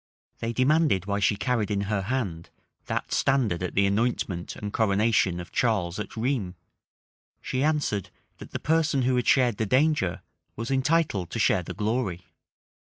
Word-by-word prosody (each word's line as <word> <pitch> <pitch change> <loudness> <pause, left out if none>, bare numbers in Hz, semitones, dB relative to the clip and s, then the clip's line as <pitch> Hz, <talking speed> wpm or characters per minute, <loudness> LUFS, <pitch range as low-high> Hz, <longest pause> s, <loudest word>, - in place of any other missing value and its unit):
They 115 - -2
demanded, 130 - +2
why 100 0 -1
she 100 +1 +2
carried 110 0 -1
in 100 -1 0
her 100 0 -1
hand 95 -7 -3 0.4
that - - -3
standard 120 -11 +1
at 90 - -4
the 100 - +4
anointment 100 -4 -1
and 105 -1 -6
coronation 105 -4 +2
of 85 - -8
Charles 100 -6 0
at 105 - -6
Rheims: 110 -7 -1 0.8
she 130 - -3
answered, 145 - 0 0.3
that - - -10
the - - -4
person 155 -4 +1
who 130 +1 +2
had 125 - 0
shared 125 -5 +4
the 110 - -1
danger 130 - +1 0.3
was 115 +3 -4
entitled 135 - +1
to - - -5
share 105 -4 +3
the 85 - -7
glory. 105 -5 -2
110 Hz, 165 wpm, -26 LUFS, 95-130 Hz, 0.8 s, the